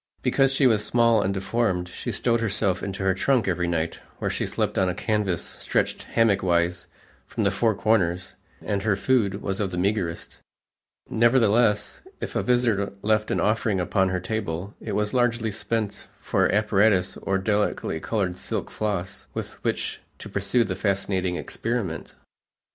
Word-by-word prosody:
Because 135 0 +3
she 135 0 +2
was 110 -4 +4
small 115 0 +3
and 95 - 0
deformed, 95 -2 0
she - - -5
stowed 115 -1 +1
herself 100 -4 0
into 95 -1 -4
her 95 0 +3
trunk 115 +3 +1
every 90 -1 0
night, 85 -1 -1 0.2
where - - -2
she - - -2
slept - - -1
on 95 -1 +2
a 90 - -2
canvas 105 -6 0
stretched - - -1
hammock 115 -4 +2
wise 85 -1 +1 0.4
from 110 - -2
the 100 - +3
four 110 +2 +1
corners 95 -4 +1 0.3
and 100 -1 -1
her 110 -2 +2
food 100 -3 +1
was 95 -1 -2
of 100 -2 0
the 90 - -5
meagerest; 90 -3 -1 0.7
nevertheless 115 -2 +3 0.2
if - - -5
a - - +2
visitor 120 -6 +1
left 105 0 +2
an - - 0
offering 110 -2 +1
upon 95 +2 +1
her 95 0 -1
table, 100 -2 -3
it 110 - -4
was 105 +1 0
largely 120 -3 +1
spent 110 0 -3
for - - +1
apparatus 100 -2 +3
or 95 0 -1
delicately 105 -4 0
colored 95 -2 -1
silk - - -4
floss, 100 -3 -3
with - - -4
which - - -2 0.2
to - - -9
pursue 125 -2 +1
the 95 -3 -3
fascinating 95 -2 0
experiment. 110 -3 -3
100 Hz, 165 wpm, -25 LUFS, 95-110 Hz, 0.7 s, was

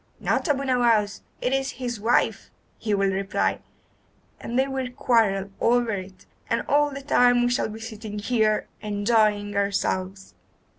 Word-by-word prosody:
'Not - - 0
Abu 275 -1 +1
Nowas, 235 -6 +2 0.2
it 250 - 0
is 270 0 -1
his 245 -3 -4
wife,' 225 +4 +1 0.3
he 215 -2 0
will 195 -1 +1
reply, 195 +1 -1 0.8
and 240 - -4
they 265 +1 +3
will 265 -2 -3
quarrel 215 -6 +1
over 240 -1 +3
it, 185 -2 -7 0.2
and 230 - 0
all 295 +1 +3
the 275 -1 -8
time 245 -3 +4
we 245 - +1
shall 245 - 0
be 220 +1 -8
sitting 220 -2 -7
here 215 0 +1
enjoying 210 -1 +1
ourselves. 195 -1 -2
225 Hz, 150 wpm, -24 LUFS, 205-245 Hz, 0.8 s, time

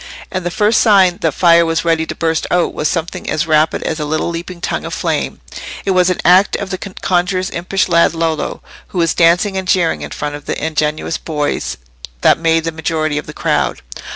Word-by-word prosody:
And 185 -1 -3
the 175 - -1
first 210 +5 +2
sign 190 -5 +4
that 160 - +2
fire 170 -1 +5
was 165 0 -1
ready 165 -1 +1
to - - -5
burst 160 -1 -1
out 175 -1 +1
was 150 - -1
something 170 -2 -3
as 155 +1 0
rapid 155 -1 +2
as 160 - -3
a 150 - -2
little 155 +3 -1
leaping 170 +1 -6
tongue - - -3
of - - -5
flame: - - -2 0.4
it 195 - +1
was 185 -1 +3
an 185 - -1
act 185 +3 +5
of 200 -1 -4
the 185 - -3
conjuror's 185 -1 -1
impish 180 +3 -1
lad 170 -1 +3
Lollo, 165 -1 -2 0.2
who - - -8
was 165 -1 +2
dancing 175 +4 +3
and 190 -1 -3
jeering 175 -3 +1
in - - -6
front 150 0 -4
of 145 0 -8
the - - -2
ingenuous 155 +1 -1
boys 150 -2 -2 0.4
that - - +4
made 165 -1 +2
the 165 - -2
majority 155 -1 -1
of - - -9
the - - -6
crowd. - - -1
170 Hz, 210 wpm, -16 LUFS, 160-185 Hz, 0.4 s, fire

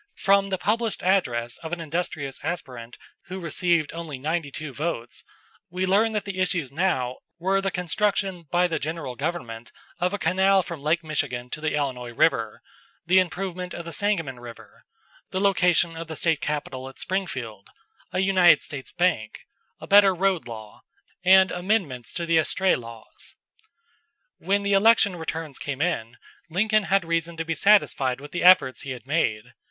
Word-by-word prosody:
From 195 0 +3
the 190 - -1
published 220 +4 -1
address 120 -11 0
of 160 - -8
an 175 - -3
industrious 160 -4 -4
aspirant 125 -9 -6 0.3
who 185 +2 -6
received 170 -2 0
only 165 -4 -6
ninety 155 +3 -2
two 150 0 -7
votes, 135 -6 -4 0.5
we 185 +2 -2
learn 210 +4 +3
that 210 -1 -2
the 195 -2 -5
issues 175 -7 0
now 135 -6 0 0.2
were 190 +3 +1
the 195 - 0
construction 190 -1 -1
by 175 +3 +3
the 165 -2 -1
general 155 -4 -4
government 125 -7 -5 0.3
of 180 +1 +1
a 205 - -2
canal 190 0 +3
from 170 -5 -7
Lake 160 +3 +1
Michigan 130 -6 -3
to 155 - -5
the 155 -1 -1
Illinois 130 -4 -2
River, - - +1 0.4
the 185 +2 +5
improvement 180 0 -3
of 170 - -7
the 170 - -6
Sangamon 165 -11 -1
River, 120 -1 -13 0.4
the 185 - -2
location 180 -4 +2
of 165 0 -6
the 160 - -6
State 160 -1 +1
capital 135 -3 -4
at 135 - -16
Springfield, 130 - -4 0.4
a 185 - 0
United 185 -3 +5
States 140 -3 -7
bank, 160 -12 0 0.4
a - - -9
better 200 -1 +6
road 190 -3 0
law, 110 -3 -10 0.4
and 190 0 +6
amendments 175 - -1
to 170 - -3
the 165 -1 +3
estray 185 +4 +2
laws. 115 -2 -11 1.0
When 200 +3 0
the 200 0 +1
election 205 -1 +5
returns 160 -3 -5
came 140 -2 -4
in 120 -8 -2 0.3
Lincoln 215 +4 +2
had 195 -2 +2
reason 165 0 -2
to 165 - -3
be 165 - -1
satisfied 140 -9 +3
with 145 +1 -11
the 180 - -3
efforts 180 -8 +6
he 135 - -5
had 125 -1 -11
made. 130 -8 -1
170 Hz, 170 wpm, -25 LUFS, 140-190 Hz, 1.0 s, better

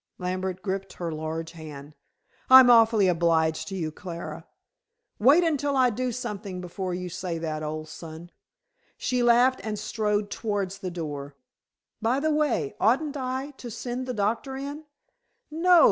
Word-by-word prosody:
Lambert 185 0 -3
gripped 195 -1 -3
her 170 -2 -4
large 160 +1 -4
hand. 150 -3 -10 0.5
"I'm 260 -1 +10
awfully 225 -4 +6
obliged 160 -2 +2
to 195 - -5
you, 160 -4 -2
Clara." 170 +2 -7 0.7
"Wait 280 +10 +6
until 290 -4 +1
I 255 -2 +4
do 250 +3 -2
something 210 -6 -5
before 180 +1 -4
you 180 0 -4
say 180 -1 -4
that, 155 -2 -3
old 155 0 -4
son," 165 +2 -10 0.7
she 250 -1 0
laughed 245 +2 +4
and 215 -1 -3
strode 210 -1 -1
towards 200 -3 -2
the 190 -3 -4
door. 145 -5 -6 0.7
"By 235 +4 +2
the 310 +1 +1
way, 275 - 0
oughtn't 275 +7 +2
I 260 +1 -3
to 245 - -8
send 245 +3 -5
the 250 - -2
doctor 225 +6 -1
in?" 285 +3 -6 0.7
"No. 345 +3 +5
205 Hz, 150 wpm, -26 LUFS, 170-255 Hz, 0.7 s, I'm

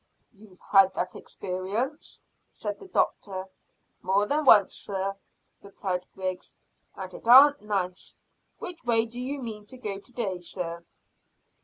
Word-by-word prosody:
"You've 200 -3 -18
had 195 -1 +5
that 185 - -2
experience?" 200 +10 -4 0.3
said 205 -1 -5
the - - -11
doctor. 190 - -1 0.6
"More'n 205 +11 +1
once, 205 -7 +7
sir," 195 0 -3 0.5
replied 185 -2 -4
Griggs, 185 -1 -4 0.4
"and 185 -1 -7
it - - -10
aren't 285 +4 +9
nice. 190 -4 -3 0.4
Which 345 -4 -7
way 230 -2 +3
do 235 +2 -9
you 275 +3 -3
mean 215 -4 -7
to 255 - -10
go 205 -5 -4
to 225 - -16
day, 205 -7 -2
sir?" 170 -1 -5
200 Hz, 135 wpm, -27 LUFS, 185-240 Hz, 0.6 s, aren't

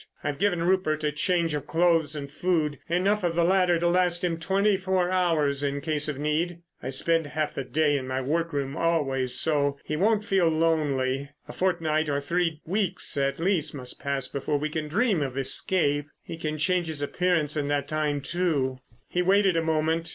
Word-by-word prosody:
I've 140 - -3
given 185 -4 +1
Rupert 170 -4 +1
a 150 - +1
change 170 +1 0
of 145 0 -4
clothes 165 -3 +2
and 140 -2 -6
food—enough 175 +5 0
of 170 -1 0
the 170 - +3
latter 180 -1 +3
to 170 +1 +1
last 175 0 +2
him 170 -2 -1
twenty 195 +4 +2
four 185 -1 0
hours 160 -6 +1
in 140 0 -1
case 150 0 -1
of 145 - -3
need. 165 +4 -1 0.2
I - - -4
spend 160 +4 +1
half 155 +1 -2
the 135 - -3
day 145 +3 +1
in 130 - -7
my 130 0 -2
workroom 145 -1 -2
always, 135 -7 0
so—he 145 -1 0
won't 210 +5 +2
feel 190 -4 +2
lonely. 145 -4 0 0.2
A - - -8
fortnight 160 -4 0
or 140 0 0
three 165 +1 -1
weeks 190 +1 0
at 140 +1 0
least 165 -4 0
must 125 -3 -7
pass 140 -2 -2
before 145 +2 -2
we 155 +2 -2
can 155 -1 -3
dream 200 +1 +1
of 135 -2 -3
escape. 145 +1 +1 0.2
He - - -7
can 155 -2 -4
change 175 +2 +1
his 150 -2 -4
appearance 165 -1 0
in 145 -2 -1
that 145 -1 -1
time, 150 -2 -1
too." 140 -5 -1 0.3
He 180 - -1
waited 195 0 +3
a 165 - +2
moment. 160 +1 0
160 Hz, 190 wpm, -26 LUFS, 145-175 Hz, 0.3 s, the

